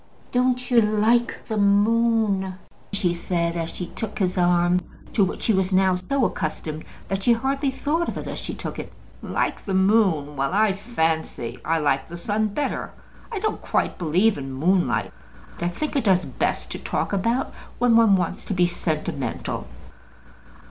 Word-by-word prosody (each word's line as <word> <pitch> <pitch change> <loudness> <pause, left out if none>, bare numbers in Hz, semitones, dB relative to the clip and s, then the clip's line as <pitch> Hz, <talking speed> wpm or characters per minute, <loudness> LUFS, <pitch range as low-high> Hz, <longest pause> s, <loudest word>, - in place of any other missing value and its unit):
"Don't 250 0 +1
you 235 -1 +6
like 220 +3 +1
the 220 - -2
moon?" 205 -1 +3 0.4
she 190 -4 +1
said, 170 -1 -1
as 165 -1 -2
she 180 - -5
took 215 +4 -5
his 185 -3 0
arm, 175 0 +3 0.3
to 205 - +4
which 190 - -2
she 225 - +3
was 190 0 +1
now 190 0 +4
so 225 +9 0
accustomed 155 -2 -3 0.2
that 195 0 -2
she 235 +4 +5
hardly 270 +4 0
thought 305 +5 -1
of - - -3
it - - -5
as - - -5
she - - -5
took - - -6
it. - - -7 0.3
"Like - - -2
the 195 - -2
moon? 190 -7 +3
well; 135 +6 -1
I 215 -1 +4
fancy 160 - -2
I 165 - +1
like 135 -3 +1
the 170 - -8
sun 210 +5 0
better. 280 +8 -3 0.4
I 445 - -3
don't 430 +2 -2
quite - - -1
believe 180 +3 +2
in 135 -1 -6
moonlight. 135 - +1 0.5
I 175 - 0
think 295 - -3
it 275 - +1
does 185 -3 +3
best 130 - -2
to - - -5
talk - - -2
about 230 +7 0 0.2
when 245 -2 +4
one 225 -3 +6
wants 185 0 -2
to 200 - -2
be 180 -1 +4
sentimental." 160 -4 -3
190 Hz, 175 wpm, -24 LUFS, 170-225 Hz, 0.5 s, you